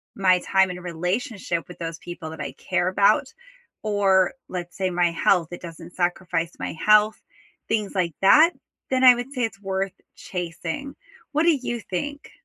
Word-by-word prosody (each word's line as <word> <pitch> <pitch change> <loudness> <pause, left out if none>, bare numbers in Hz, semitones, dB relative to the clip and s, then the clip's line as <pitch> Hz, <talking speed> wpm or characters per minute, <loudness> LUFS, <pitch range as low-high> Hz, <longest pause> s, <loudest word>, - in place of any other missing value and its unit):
my 185 -2 +4
time 190 +1 +2
and 180 0 -7
relationship 180 +1 -2
with 180 - -11
those 165 -1 -4
people 175 -2 -8
that 160 - -8
I - - -5
care 180 -1 -1
about, 200 +7 +3 0.6
or 195 -3 +3 0.2
let's 175 -1 -6
say 190 -2 0
my 175 -1 +2
health, 170 0 +2
it 175 - -7
doesn't 170 0 -10
sacrifice 175 -1 -1
my - - -4
health, 215 +5 +4 0.5
things 210 -2 -1
like 175 -3 0
that, 305 - +7 0.4
then 260 0 +1
I 250 -1 +10
would 245 +2 -6
say 260 -3 -3
it's 220 -3 -3
worth 195 0 -2 0.2
chasing. 180 - -5 0.4
What 305 +1 +2
do 335 -3 +4
you 240 -2 -3
think? 285 +11 -4
185 Hz, 170 wpm, -24 LUFS, 175-215 Hz, 0.6 s, I